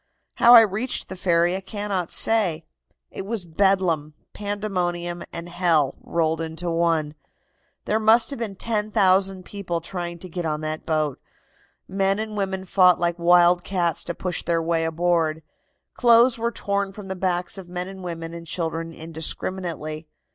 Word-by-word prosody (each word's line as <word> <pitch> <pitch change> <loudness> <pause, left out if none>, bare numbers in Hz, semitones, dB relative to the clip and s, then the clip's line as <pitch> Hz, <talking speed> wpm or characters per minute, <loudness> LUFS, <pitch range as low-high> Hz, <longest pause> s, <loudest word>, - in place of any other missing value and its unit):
"How 240 +1 +8
I 230 - +11
reached 220 +4 -1
the 190 - -6
ferry 175 -1 +2
I 190 - -4
cannot 195 -2 -3
say. 180 -8 +2 0.5
It - - -6
was 205 -2 -4
bedlam, 170 -4 +1 0.2
pandemonium 180 -4 -3
and 170 +1 -6
hell 170 -6 +2
rolled 165 -1 -1
into 165 +2 -4
one. 165 -3 +1 0.7
There 215 - +1
must 225 +4 +4
have 275 - -5
been 215 -4 -4
10,000 195 -3 +1
people 185 -4 -4
trying 175 0 -5
to 185 - -6
get 175 0 -5
on 155 -1 -2
that 155 0 -5
boat. 155 -4 -1 0.7
Men 195 +1 0
and 215 0 -4
women 190 -2 -2
fought 180 -2 +5
like 170 0 -1
wild 175 +1 +5
cats 175 -4 -1
to 175 - -4
push 180 -2 -3
their 170 0 +1
way 165 0 0
aboard. 165 -1 0 0.5
Clothes 235 0 +4
were 235 +1 0
torn 200 -2 -2
from 205 -1 -10
the 190 - -4
backs 180 0 -2
of 180 -2 -11
men 180 0 -4
and 190 0 -9
women 165 -2 -6
and 170 0 -9
children 165 0 -3
indiscriminately. 160 -1 -3
175 Hz, 160 wpm, -23 LUFS, 165-195 Hz, 0.7 s, I